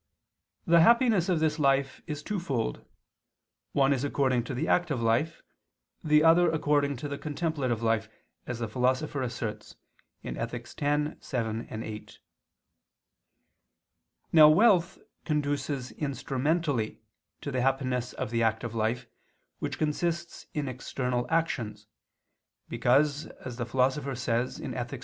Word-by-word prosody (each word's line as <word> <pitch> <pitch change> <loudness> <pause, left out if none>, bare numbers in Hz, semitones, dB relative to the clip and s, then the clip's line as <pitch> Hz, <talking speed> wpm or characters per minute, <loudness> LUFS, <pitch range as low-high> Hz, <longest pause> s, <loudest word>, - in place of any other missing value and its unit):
The 170 0 +6
happiness 225 -2 +4
of 175 -3 +2
this 155 0 +1
life 135 -1 +2
is 150 -1 -5
twofold, 140 - -2 0.9
one 140 0 +3
is 135 -1 -2
according 130 -4 +1
to 130 - -4
the 125 - -1
active 165 -7 +1
life, 115 +9 0 0.6
the 150 0 +4
other 170 +1 +6
according 145 -2 +1
to 145 - -5
the 140 0 -5
contemplative 145 -7 -2
life, 110 -1 +1 0.4
as 120 - -3
the 115 -1 -3
Philosopher 130 +4 0
asserts 120 -3 -5 0.5
(Ethic. 120 +1 -5
x, 150 +1 0
7, 115 -4 -3
8). 110 -1 -7 2.1
Now 155 -2 +9
wealth 185 0 +4 0.3
conduces 145 -3 -1
instrumentally 140 -3 -1 0.4
to 140 - -4
the 130 -1 0
happiness 130 -2 0
of - - -4
the 115 -1 +1
active 110 +1 0
life 115 +2 -1 0.5
which - - -3
consists 170 +3 -2
in 150 -2 -1
external 125 -1 -2
actions, 120 -11 -1 0.8
because 145 +4 +2 0.2
as 125 -2 -6
the 120 -2 -3
Philosopher 130 +2 0
says 120 0 -1
(Ethic. 120 0 -5
135 Hz, 120 wpm, -28 LUFS, 120-155 Hz, 2.1 s, Now